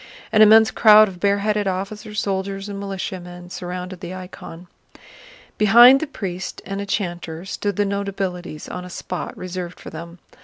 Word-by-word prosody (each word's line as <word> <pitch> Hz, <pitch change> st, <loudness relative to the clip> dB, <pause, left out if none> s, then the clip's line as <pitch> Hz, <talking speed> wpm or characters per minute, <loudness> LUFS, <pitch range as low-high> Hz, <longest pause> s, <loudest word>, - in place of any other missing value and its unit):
An 215 Hz, -, +4 dB
immense 220 Hz, +1 st, +7 dB
crowd 215 Hz, -1 st, +7 dB
of 185 Hz, -3 st, -9 dB
bareheaded 205 Hz, +1 st, +1 dB
officers, 205 Hz, +3 st, -4 dB
soldiers, 195 Hz, 0 st, -3 dB
and 200 Hz, -1 st, -6 dB
militiamen 180 Hz, -2 st, -6 dB
surrounded 180 Hz, 0 st, -6 dB
the 180 Hz, 0 st, -7 dB
icon. 180 Hz, -2 st, -10 dB, 0.9 s
Behind 240 Hz, +5 st, +8 dB
the 315 Hz, -, -3 dB
priest 190 Hz, -9 st, -6 dB
and 195 Hz, +1 st, -4 dB
a 200 Hz, -, -6 dB
chanter 175 Hz, -4 st, -4 dB
stood 200 Hz, 0 st, -3 dB
the 205 Hz, -, +1 dB
notabilities 195 Hz, -5 st, -4 dB
on 180 Hz, -, -6 dB
a 180 Hz, -, -9 dB
spot 180 Hz, 0 st, -6 dB
reserved 180 Hz, -1 st, -6 dB
for -, -, -10 dB
them. 170 Hz, +2 st, -9 dB
195 Hz, 155 wpm, -21 LUFS, 180-205 Hz, 0.9 s, Behind